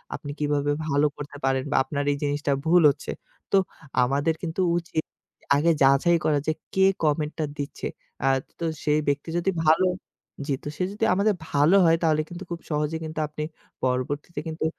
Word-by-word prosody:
আপনি 145 - -6
কিভাবে 145 -1 +1 0.2
ভালো 145 0 +3
করতে 145 0 -8
পারেন 135 0 +1
বা - - +1
আপনার 140 +2 -3
এই 140 - -1
জিনিসটা 145 0 0
ভুল 175 +2 +5
হচ্ছে। 140 - -3 0.4
তো 195 - +5 0.5
আমাদের 140 +5 +1
কিন্তু 170 +2 -2 0.2
উচিত 165 -2 -2 0.5
আগে 155 +4 +3
যাচাই 140 +6 +5
করা 150 -2 +3
যে, - - +4 0.2
কে 190 0 +4 0.2
কমেন্টটা 155 +1 0
দিচ্ছে। 140 -1 -4 0.4
আ - - +3 0.3
তো 170 - -2 0.2
সেই 150 0 +3
ব্যক্তি 145 +3 0
যদি 175 +3 +1
ভালো 160 +4 +5 0.6
জি, 145 - +1
তো - - -7
সে - - 0
যদি 215 +2 0
আমাদের 200 +3 +3 0.2
ভালো 145 +6 +4
হয় 165 0 +5
তাহলে 155 -2 +3
কিন্তু 175 +2 -7
খুব 170 - -3
সহজেই 150 +2 -1
কিন্তু 155 0 -5
আপনি 150 +1 -5 0.4
পরবর্তীতে 130 +6 -1
কিন্তু 160 0 -3
150 Hz, 175 wpm, -25 LUFS, 145-165 Hz, 0.6 s, ভুল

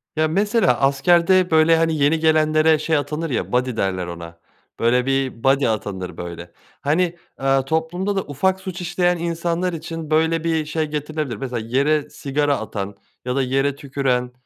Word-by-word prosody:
Ya, 155 0 +2
mesela 200 - +2
askerde, 175 +6 +3
böyle, 160 +1 +5
hani, 165 0 +1
yeni 145 +3 +2
gelenlere 155 0 +3
şey 160 +1 +1
atanır 150 +3 -3
ya 125 - -2
"buddy" 125 0 0
derler 95 -3 -1
ona, 85 -1 -9 0.4
böyle, 125 +2 +2
bir 135 -3 -1
buddy 135 +1 +3
atanır, 100 -4 -3
böyle. 85 0 -7 0.3
Hani, 170 +4 +1 0.2
eee, 135 0 +2
toplumda 170 +7 -1
da 195 - +1
ufak 185 +7 0
suç 185 -1 -6
işleyen 175 0 +1
insanlar 170 +1 -2
için 165 -1 -6
böyle 160 +1 +2
bir 160 -2 0
şey 155 +1 -1
getirilebilir. 150 -3 -3
Mesela 125 -1 -4
yere 140 +5 +1
sigara 145 -1 -1
atan 100 -2 -5 0.3
ya 125 0 -2
da 135 - +2
yere 135 +2 0
tüküren, 135 -3 -1
150 Hz, 160 wpm, -21 LUFS, 130-165 Hz, 0.4 s, böyle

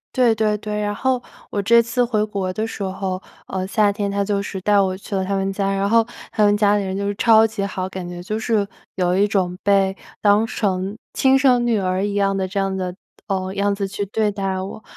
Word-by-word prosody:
对 250 -3 +4
对 215 -1 +1
对。 210 0 -4
然 205 0 -1
后 260 +2 0 0.3
我 205 - -1
这 235 +4 +5
次 235 +2 0
回 225 -3 +1
国 195 -3 -3
的 215 +3 -2
时 225 - -7
候， 190 -1 -3 0.3
呃， 190 -1 -3
夏 205 +1 +3
天 200 0 -2
他 200 0 0
就 200 0 0
是 200 -1 -5
带 205 +1 +3
我 190 -1 +1
去 200 +1 -6
了 190 - 0
他 195 +1 -1
们 195 0 0
家， 195 0 0
然 195 +1 0
后 230 +1 +4 0.3
他 215 - +1
们 205 0 +4
家 205 -1 +4
里 205 - -1
人 190 0 -3
就 200 0 -2
是 205 - -2
超 220 +1 +5
级 220 -2 -3
好， 185 -1 -3
感 185 -2 -6
觉 175 0 -7
就 215 +4 -3
是 220 -3 +1 0.3
有 180 -1 +1
一 200 +1 +4
种 185 -3 0
被 195 -1 +3 0.3
当成 205 -2 +1 0.2
亲 265 0 +4
生 255 -3 +4
女 235 -2 +2
儿 185 0 0
一 205 0 -2
样 195 -1 +2
的 190 -1 -1
这 200 +2 -3
样 195 -1 0
的 180 -1 -3 0.3
呃， 190 -1 -2
样 200 0 +1
子 200 -1 -2
去 200 +1 -3
对 210 +1 0
待 195 -2 -2
我。 195 +3 -7
200 Hz, 260 characters per minute, -21 LUFS, 190-215 Hz, 0.3 s, 这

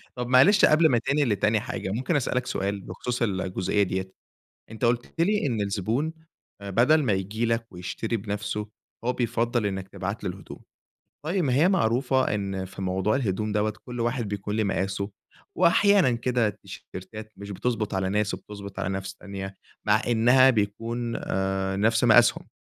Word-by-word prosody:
طيّب 125 -1 -3
معلش 155 +12 +6
قبل 155 +1 +5
ما 120 - +3
تنقل 140 +2 +1
لتاني 105 +1 +2
حاجة، 95 - -4
ممكن 130 - -1
أسأل 125 -2 0
لك 125 - 0
سؤال 100 0 -2
بخصوص 125 +4 -5
الجزئية 95 -1 0
ديَّة، 95 0 -3 0.6
أنت 110 +2 -4
قُلت 120 +1 0
لي 205 -2 +2
إن 115 -5 -1
الزبون 110 - -1 0.5
آآ، 100 0 -6
بدل 145 +9 +4
ما 115 -6 +1
ييجي 105 +5 -1
لك 115 0 0
ويشتري 110 +6 -3
بنفسُه، 105 0 -4 0.4
هو 125 - +1
بيفضّل 120 -2 0
إنّك 95 -1 -4
تبعت 100 +2 -5
له - - -1
الهدوم. 95 - -10 0.7
طيّب 180 +2 0
ما 130 -3 +1
هي 160 +8 +4
معروفة 130 - +2
إن 95 -2 -3
في 95 +1 -9
موضوع 95 +3 0
الهدوم 105 -4 -1
دوَّة 105 0 0
كل 120 -1 -6
واحد 120 -1 -1
بيكون 105 +1 -4
لي 110 - +1
مقاسُه، 100 +1 -2 0.4
وأحيانًا 185 -3 +4
كده 120 -1 +1
التيشيرتات 110 +2 -9
مش 100 0 -8
بتضبط 110 +1 -2
على 95 0 0
ناس 105 0 0
وبتضبط 100 -2 -8
على 90 - -1
ناس 95 0 -4
تانية، 95 -1 -7 0.3
مع 105 +1 +4
إنها 125 +3 +5
بيكون 115 +2 -1
آآ، 95 0 -1
نَفْس 115 +3 +2
مقاسهم، 120 +1 +5
110 Hz, 165 wpm, -26 LUFS, 100-125 Hz, 0.7 s, معلش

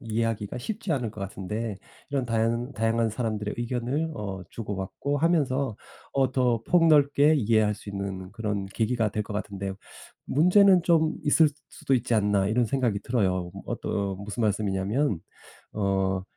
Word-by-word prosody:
이해하기가 115 -2 -2
쉽지 205 - -5
않을 120 -6 -1
것 110 - -10
같은데 100 +3 -4 0.3
이런 135 -3 0
다양 115 +3 0
다양한 115 0 +1
사람들의 110 -2 -3
의견을 125 +6 -2
어 95 -7 -5
주고 105 -3 -5
받고 140 +9 -3
하면서 140 -7 +1 0.4
어 135 -2 +1
더 120 -3 +1
폭 170 -2 +4
넓게 145 0 +5
이해할 110 -3 +2
수 105 - -12
있는 100 -2 -5
그런 100 -2 -3
계기가 110 +2 0
될 105 - -2
것 105 - -8
같은데 100 -2 -4 0.5
'문제는 180 +4 +5
좀 160 -2 +3
있을 155 +1 +5 0.2
수도 135 - -1
있지 120 -1 +1
않나.' 100 -2 +2
이런 120 +3 +2
생각이 120 -4 0
들어요. 95 -7 0
어떤 100 -2 -2
무슨 105 +3 -5
말씀이냐 100 -2 0
하면 105 - 0 0.5
어 95 -2 0
115 Hz, 320 characters per minute, -26 LUFS, 100-135 Hz, 0.5 s, 넓게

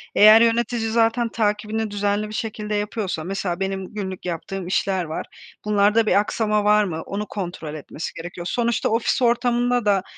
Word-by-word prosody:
Eğer 215 +2 +8
yönetici 235 0 +2
zaten 230 +1 +2
takibini 215 0 -1
düzenli 205 +1 -1
bir 215 - -8
şekilde 215 -1 -3
yapıyorsa, 205 -5 -2
mesela, 190 -1 -3
benim 195 0 -2
günlük 190 -3 -5
yaptığım 175 +2 -4
işler 190 0 0
var. 160 -1 -5 0.4
Bunlarda 210 +2 +3
bir 205 - +4
aksama 210 0 0
var 210 0 +4
mı? 165 -4 -3
Onu 205 +1 -4
kontrol 175 -6 -5
etmesi 155 +2 -6
gerekiyor. 175 +1 -7
Sonuçta 235 -1 0
ofis 230 +4 +1
ortamında 245 0 +2
da, 195 -2 +3
210 Hz, 160 wpm, -22 LUFS, 190-225 Hz, 0.4 s, Eğer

